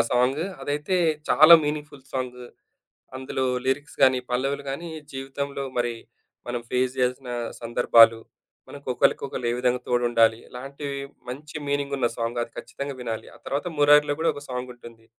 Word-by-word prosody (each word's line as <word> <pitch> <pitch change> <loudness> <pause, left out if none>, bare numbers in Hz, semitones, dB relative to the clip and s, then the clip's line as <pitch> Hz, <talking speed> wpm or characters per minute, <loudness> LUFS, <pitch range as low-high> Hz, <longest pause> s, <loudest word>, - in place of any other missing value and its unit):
Song 125 +4 +2 0.2
అదైతే 150 +6 -1 0.3
చాలా 155 +3 +9
meaningful 150 -2 -4
song 125 -1 -3 0.8
అందులో 130 0 -2 0.2
లిరిక్స్ 145 +4 -2
గాని 130 -1 +5
పల్లవులు 135 +3 -1
గానీ 165 +5 -5 0.2
జీవితంలో 140 +1 -4 0.2
మరి 120 -1 0 0.5
మనం 120 0 -3
ఫేస్ 125 0 +1
చేయలసిన 125 0 -1 0.3
సందర్భాలు, 115 -1 +5 0.5
మనకు 140 -1 -12
ఒకళ్ళకొకళ్ళు 125 -1 0
ఏ - - 0
విధంగా 125 0 +1
తోడుండాలి 120 -2 +3
ఇలాంటివి 140 +2 -6 0.3
మంచి 150 +5 -8
మీనింగున్న 140 -3 0
సాంగ్ 115 +1 -2
అది 115 - -11
ఖచ్చితంగా 140 -1 -6
వినాలి. 115 -2 -4
ఆ - - -14
తర్వాత 140 +5 -2
'మురారిలో' 145 0 +5
కూడా 165 - +3
ఒక 145 - -8
సాంగుంటుంది. 120 -2 -8
130 Hz, 135 wpm, -25 LUFS, 125-145 Hz, 0.8 s, చాలా